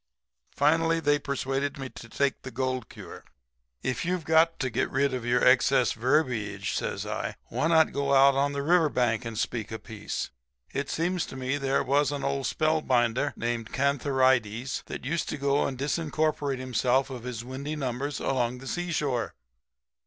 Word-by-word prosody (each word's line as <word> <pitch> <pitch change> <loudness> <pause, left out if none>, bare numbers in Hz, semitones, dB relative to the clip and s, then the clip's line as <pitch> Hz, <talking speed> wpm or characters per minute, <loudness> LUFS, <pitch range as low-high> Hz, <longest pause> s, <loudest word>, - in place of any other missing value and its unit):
Finally, 165 +3 +3
they 145 -2 +2
persuaded 140 0 -2
me 135 -1 -5
to 115 -2 -12
take 140 +3 0
the 130 - -7
gold 130 -1 -2
cure.' - - -10 0.6
"'If 130 -2 -1
you've 180 -2 -1
got 160 +1 +4
to 130 -2 -2
get 115 - 0
rid 135 +1 +1
of 125 -2 -3
your 125 +1 +3
excess 125 0 +4
verbiage,' 110 -6 0
says 100 - -2
I, 105 0 -3
'why 130 +7 0
not 160 -1 +4
go 140 0 0
out 135 +1 +7
on 140 +1 +1
the 140 0 -2
river 165 0 +4
bank 120 -3 0
and 115 -2 -5
speak 110 0 -2
a 110 - -3
piece? 110 -2 -5 0.4
It 140 +1 -2
seems 175 +2 -1
to - - -9
me 130 +2 -2
there 135 0 +1
was 140 +2 +2
an 145 -1 -3
old 140 -1 -1
spell 155 0 +1
binder 125 +1 +1
named 115 -1 -3
Cantharides 130 -3 +1
that - - -6
used 160 +4 -1
to - - -3
go 140 0 +1
and 130 - -5
disincorporate 150 0 -1
himself 130 +1 +1
of 125 -2 -6
his 120 -1 -6
windy 140 +4 -5
numbers 140 0 -3
along 125 -2 0
the 130 - -11
seashore.' 150 -9 -2
135 Hz, 175 wpm, -27 LUFS, 125-145 Hz, 0.6 s, out